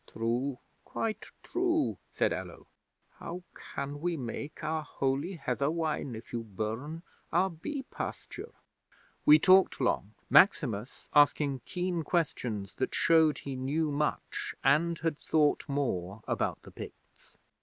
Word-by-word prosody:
'"True, 120 +4 -1 0.3
quite 220 -1 -3 0.2
true," 345 -4 +1
said - - +1
Allo. - - -7 0.5
"How 175 +2 -6
can 140 +1 -6
we 175 -1 0
make 140 +5 -5
our 155 +1 0
holy 140 +4 -1
heather 140 -3 -1
wine, 155 -6 -1
if 110 +2 -10
you 120 - -1
burn 115 - -4 0.3
our 185 +3 +3
bee 270 - -5
pasture?" - - -6 0.8
'We 150 - +10
talked 185 +4 +5
long, 110 -5 0
Maximus 130 - +3
asking 145 -2 +4
keen 180 -1 -1
questions 125 - -1
that 130 - -1
showed 160 -2 +5
he 135 -2 -5
knew 145 +4 0
much 150 +1 -2
and 165 +5 +3
had 160 -2 -1
thought 150 -1 +2
more 110 -8 -2
about - - -1
the - - -12
Picts. - - -12
150 Hz, 130 wpm, -31 LUFS, 130-165 Hz, 0.8 s, We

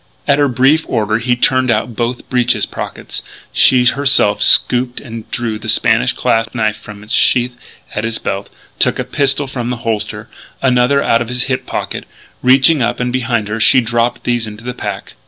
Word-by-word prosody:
At 140 0 +3
her 145 - +3
brief 135 +5 +2
order 110 0 0
he 125 +1 0
turned 130 +1 +1
out 120 0 -1
both 120 +2 -3
breeches 125 -1 +1
pockets. - - -7 0.3
She 125 -1 +4
herself 140 -6 +2
stooped 125 0 +4
and 115 -4 -9
drew 115 -3 -3
the - - -6
Spanish - - +2
clasp 115 +2 -1
knife 110 -2 0
from 105 -1 -12
its 105 - -5
sheath 125 0 +2 0.4
at 110 - -3
his 110 0 -1
belt, 100 +1 -4 0.3
took - - +2
a - - -2
pistol 140 0 0
from 125 -3 -5
the 125 - -2
holster, 110 -2 -2 0.3
another 130 +2 +2
out 115 - +2
of 120 - -4
his 125 0 0
hip 130 -1 -3
pocket. - - -4 0.4
Reaching 135 +4 +4
up 120 +1 -1
and 125 0 -2
behind 120 -4 -1
her, 105 +2 -4
she 120 - +5
dropped 120 +1 -1
these 120 -2 -1
into 105 +1 -10
the 125 0 -5
pack. - - -6
120 Hz, 190 wpm, -15 LUFS, 115-130 Hz, 0.4 s, she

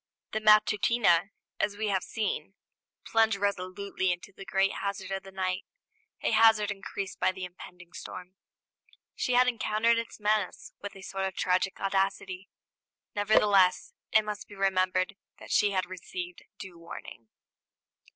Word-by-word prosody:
The 220 - -1
Matutina, 210 -3 +4 0.3
as 205 -1 0
we 215 0 -1
have 190 -2 +1
seen, 205 -2 -3 0.5
plunged 225 -2 +3
resolutely 195 -1 -1
into 175 +3 -5
the 195 - -11
great 195 0 +2
hazard 195 -1 -3
of 195 0 -2
the 195 - -12
night, 185 -1 -2 0.6
a - - +2
hazard 220 -2 +5
increased 195 -1 -6
by - - +3
the 185 0 -6
impending 175 -1 -12
storm. 180 0 -8 0.8
She 250 - 0
had 250 +1 +5
encountered 230 -1 +2
its 230 - -7
menace 210 -2 -1
with 205 - -7
a 195 - -11
sort 195 0 -3
of 190 -1 -3
tragic 185 +1 +1
audacity; 195 -1 -1 0.7
nevertheless, 205 -2 +4 0.2
it 220 -1 +5
must 210 -1 -5
be 205 - -12
remembered 185 0 +1 0.2
that - - -11
she 205 - +4
had 190 -2 0
received 180 0 -7
due 180 -3 -10
warning. 165 -8 -10
195 Hz, 145 wpm, -29 LUFS, 185-210 Hz, 0.8 s, hazard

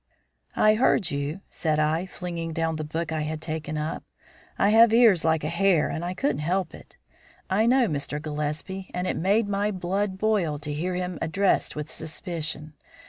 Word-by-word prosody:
"I 215 - +5
heard 215 -5 +2
you," 145 +6 -3
said 155 -2 -1
I, 155 +4 +1
flinging 170 -2 -5
down 165 0 -1
the 155 - -3
book 160 +2 -3
I 160 -1 -1
had 155 +1 -3
taken 155 -1 -4
up. 155 +1 -3 0.5
"I 200 - +3
have 225 +1 +7
ears 225 -8 +6
like 160 -1 +2
a - - -1
hare 170 0 +2
and 160 - -3
I 180 +1 -3
couldn't 275 - 0
help 175 +3 -1
it. - - -14 0.5
I 215 +4 +3
know 250 0 +4
Mr. 145 -2 -2
Gillespie, 150 +5 -4
and 180 0 -1
it - - -1
made 200 +5 +2
my 205 +1 0
blood 190 +1 -2
boil 195 -8 +1
to 150 0 -5
hear 175 +5 -2
him 180 -2 -3
addressed 190 +5 +1
with 150 +1 -5
suspicion. 155 -2 -5
170 Hz, 185 wpm, -26 LUFS, 155-195 Hz, 0.5 s, have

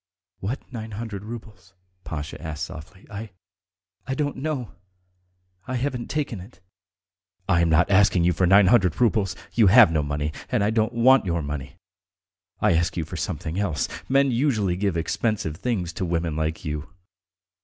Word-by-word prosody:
"What 110 +8 -3
nine 110 -2 -6
hundred 105 -2 -5
roubles?" 110 -3 -10 0.3
Pasha 80 0 -6
asked 80 -3 -4
softly. 75 +5 -11
"I... 105 +2 -6 0.8
I 130 - -1
don't 145 0 -2
know.... 135 -4 -3 1.0
I 130 - -2
haven't 125 -1 -2
taken 145 -8 -2
it." 95 +3 -14 0.9
"I 85 -3 +3
am 85 - +2
not 80 +4 +3
asking 95 -2 +4
you 90 +1 +3
for 90 +2 +2
nine 100 +2 +7
hundred 95 -5 +3
roubles.... 110 -5 +2 0.2
You 115 -4 +5
have 110 -1 +8
no 80 -2 +1
money, 75 +1 -2 0.2
and 120 -5 +1
I 105 - +2
don't 110 +1 +1
want 125 -1 +5
your 85 -2 0
money. 70 -2 -5 0.8
I - - +3
ask 85 +2 0
you 80 - -1
for - - -8
something 80 +4 -3
else.... 85 -8 0 0.2
Men 135 0 +4
usually 115 -8 +1
give 95 -2 -1
expensive 85 0 -1
things 95 -8 -2
to 95 - -4
women 85 -2 -1
like 80 0 -2
you. 75 0 -4
100 Hz, 165 wpm, -24 LUFS, 85-115 Hz, 1.0 s, have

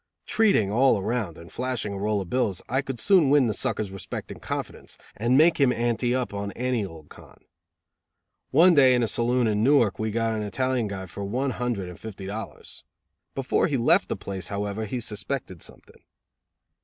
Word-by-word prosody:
Treating 205 - +2
all 125 +1 +4
around 110 -4 -2
and 85 0 -13
flashing 125 -5 -3
a - - -5
roll 105 0 0
of 95 - -7
bills 115 -7 0
I 130 +3 0
could 135 -3 -6
soon 170 - +4
win 145 -2 +5
the 110 - 0
sucker's 105 -2 -2
respect 95 -1 -7
and - - -10
confidence, - - -6 0.2
and 120 +5 +2
make 160 +2 +5
him 135 -3 +4
ante 120 +1 0
up 125 -4 -2
on 100 0 -4
any 125 -2 -1
old 80 -5 -10
con. - - -16 1.0
One 175 +6 +6
day 130 -4 +6
in 120 - +2
a - - +1
saloon 120 +3 +1
in 105 -1 +1
Newark 120 -8 +3
we 110 0 -1
got 115 +1 0
an 110 - -2
Italian 125 +2 -1
guy 95 -1 -5
for 100 +3 -7
one 130 +7 -1
hundred 120 -7 -3
and 90 +2 -10
fifty 100 -3 -8
dollars. 105 +3 -7 0.5
Before 135 -1 +1
he 140 - 0
left 115 - +3
the - - -1
place, 95 -2 -5
however, 100 +2 -3
he 125 +4 -3
suspected 105 - -4
something. - - -12
115 Hz, 190 wpm, -25 LUFS, 100-130 Hz, 1.0 s, One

